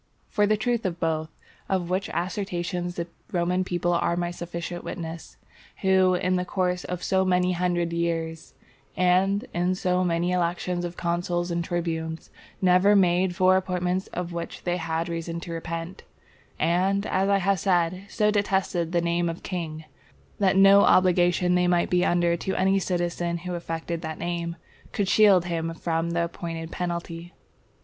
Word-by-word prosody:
For 210 -2 +2
the 215 0 +2
truth 235 +1 0
of 175 -2 -3
both 160 -1 -1 0.4
of 180 -2 -1
which 190 +2 -1
assertions 175 -1 -3
the 170 - -3 0.3
Roman 180 +1 +1
people 175 -1 -1
are 170 0 +1
my 175 0 -1
sufficient 175 0 -6
witness, 165 -1 -7 0.4
who, 190 -1 +4
in 185 0 +1
the 180 - 0
course 180 0 -1
of 180 0 -5
so 190 -1 +2
many 180 -1 +2
hundred 175 -1 0
years, 165 -1 -3 0.4
and 190 +4 +2
in 180 +2 +1
so 180 0 +1
many 175 0 0
elections 175 0 -1
of 175 0 -6
consuls 175 0 -1
and 170 0 -1
tribunes, 165 -2 -3 0.3
never 185 +3 +5
made 180 -1 +3
four 185 0 +4
appointments 180 0 -1
of 175 -1 -5
which 170 0 -6
they 175 0 0
had 165 -1 -2
reason 170 0 -4
to 170 - -7
repent; 165 +2 -5 0.6
and, 185 +5 +1
as 190 +1 +1
I 200 - +4
have 195 0 +1
said, 180 +1 +1
so 210 0 +2
detested 190 -4 0
the 170 - +3
name 170 0 0
of 165 - -6
king, 160 -4 -5 0.5
that 195 -2 +3
no 195 +1 +8
obligation 180 -1 +4
they 180 0 +3
might 175 -1 +2
be 180 0 +3
under 175 -1 +2
to 190 +3 -3
any 190 +1 +3
citizen 175 -2 -1
who 180 +1 -6
affected 165 -1 -4
that 160 -2 -5
name, 170 -1 -3 0.4
could 200 -2 0
shield 195 -3 +5
him 165 -1 -2
from 165 0 -1
the 170 0 0
appointed 165 -1 -5
penalty. 170 -1 -4
175 Hz, 165 wpm, -25 LUFS, 170-185 Hz, 0.6 s, no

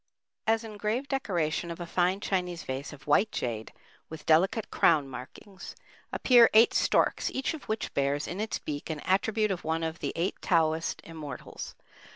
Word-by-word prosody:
As 225 +1 +3
engraved 220 +5 -3
decoration 175 - -1
of 170 - -6
a 175 - -4
fine 180 +3 +1
Chinese 180 -4 -2
vase 130 +2 -5
of 140 -2 -13
white 170 +9 +3
jade 110 -3 -3 0.4
with 155 -1 -9
delicate 190 +7 +3
crown 150 -4 +4
markings, 135 +9 -10 0.4
appear 240 -3 +6
eight 225 +2 +7
storks, - - +2
each 265 +4 -2
of 315 - -8
which 220 0 -3
bears 140 +1 0
in 180 - -5
its 220 - -2
beak 145 +1 -6
an 155 -2 -3
attribute 215 +2 +1
of 185 - -3
one 160 +1 -1
of 160 0 -3
the - - -2
Eight 175 +4 -2
Taoist 165 -1 +1
Immortals. 155 -5 -8
175 Hz, 170 wpm, -29 LUFS, 155-215 Hz, 0.4 s, eight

